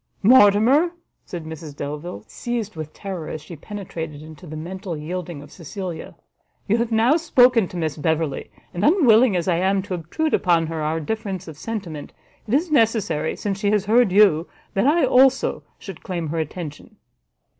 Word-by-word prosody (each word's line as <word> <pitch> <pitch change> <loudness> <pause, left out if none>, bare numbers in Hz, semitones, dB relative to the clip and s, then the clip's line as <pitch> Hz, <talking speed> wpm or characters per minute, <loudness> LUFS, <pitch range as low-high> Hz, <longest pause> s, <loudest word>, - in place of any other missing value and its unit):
"Mortimer," 245 - +5 0.3
said 170 -3 -6
Mrs 160 -2 -8
Delvile, 150 +5 -6
seized 235 -5 -4
with 155 -1 -6
terror 185 -6 -6
as 155 - -5
she 155 +3 -10
penetrated 160 -5 -7
into 155 +2 -12
the 155 - -7
mental 180 +1 -6
yielding 170 -1 -5
of 145 - -15
Cecilia, 175 0 -7 0.5
"you 215 +3 +3
have 235 0 -1
now 230 +7 +4
spoken 250 - +4
to 180 - -8
Miss 160 -3 -2
Beverley; 160 -2 -1 0.2
and 175 - -3
unwilling 250 - +5
as 175 -1 -1
I 175 -2 +2
am 190 +2 +1
to 190 - -5
obtrude 180 - -2
upon 170 -3 +3
her 160 0 -4
our 155 +2 -1
difference 195 +1 -4
of 160 - -8
sentiment, 175 -5 -6 0.3
it 215 - -3
is 320 +3 0
necessary, 215 - +1
since 200 -1 -3
she 205 -1 +1
has 210 -1 +1
heard 225 0 +4
you, 185 -5 +4 0.3
that 195 +7 +2
I, 315 +1 +4
also, 265 +1 +3 0.2
should 195 -5 -10
claim 170 -4 -4
her 165 +2 -2
attention." 155 -1 -6
185 Hz, 175 wpm, -22 LUFS, 160-225 Hz, 0.5 s, Mortimer